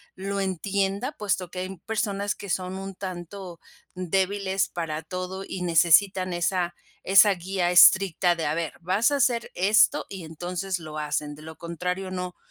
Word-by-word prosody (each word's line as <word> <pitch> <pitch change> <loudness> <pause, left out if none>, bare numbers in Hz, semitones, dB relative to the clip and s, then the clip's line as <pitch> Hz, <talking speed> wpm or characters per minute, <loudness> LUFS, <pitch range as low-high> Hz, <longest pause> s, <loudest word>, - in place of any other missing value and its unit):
lo 195 +1 -3
entienda 195 - -1
puesto 195 -6 -2
que 180 - -7
hay 185 +1 -5
personas 205 -2 -1
que 200 - -9
son 185 +1 -2
un 195 0 -7
tanto 180 -1 -7 0.3
débiles 190 +2 0
para 160 -2 -4
todo 185 +3 -5
y 185 - -5
necesitan 180 +2 +4
esa 175 0 -1 0.3
esa 195 +2 +6
guía 180 0 -1
estricta 180 -1 +6
de: 165 -3 -2
"A 150 - 0
ver, 165 -2 -3
vas 190 - +2
a - - +2
hacer 240 -4 +1
esto", 205 +4 +4
y 190 -4 -7
entonces 180 +3 -4
lo 155 -2 -8
hacen, 150 0 -2
de 150 +1 -13
lo 160 0 -9
contrario 180 +3 -4
no 180 -1 -4
185 Hz, 165 wpm, -25 LUFS, 175-195 Hz, 0.3 s, esa